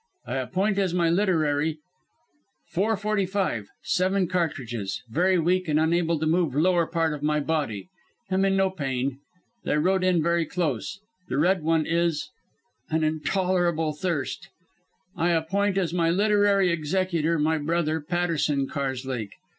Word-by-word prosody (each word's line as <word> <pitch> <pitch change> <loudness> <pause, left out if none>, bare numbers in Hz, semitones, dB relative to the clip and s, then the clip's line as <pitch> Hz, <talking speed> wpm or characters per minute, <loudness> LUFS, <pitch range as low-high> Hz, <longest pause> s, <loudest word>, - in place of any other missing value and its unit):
I 135 - -3
appoint 190 +10 0
as 185 -3 0
my 170 -2 +2
literary 160 -5 +1 0.9
"Four 210 +4 0
forty 210 -2 0
five. 185 - -1 0.2
Seven 185 0 +1
cartridges. 125 - -2
Very 180 +7 +3
weak 180 +2 +1
and 155 0 +2
unable 165 +1 +2
to 155 - -2
move 160 -3 +1
lower 170 +2 +3
part 165 -2 0
of 150 - -6
my 150 0 +1
body. 145 - -2 0.4
Am 190 +1 +2
in 195 0 +2
no 190 -1 +2
pain. 135 -5 -2 0.4
They - - 0
rode 185 +4 +2
in 180 -3 +3
very 170 -1 +1
close. 165 - -2 0.3
The - - -1
Red 180 +4 +3
One 160 0 +1
is 165 -2 0 0.6
An 160 0 +1
intolerable 170 0 0
thirst 150 -5 -3 0.7
"I 175 0 +1
appoint 195 +5 0
as 175 -4 0
my 170 -2 +2
literary 200 0 +3
executor 170 0 0
my 155 +1 +1
brother, 160 +1 0
Patterson 155 -4 0
Karslake. 130 -6 -3
165 Hz, 145 wpm, -25 LUFS, 150-185 Hz, 0.9 s, Very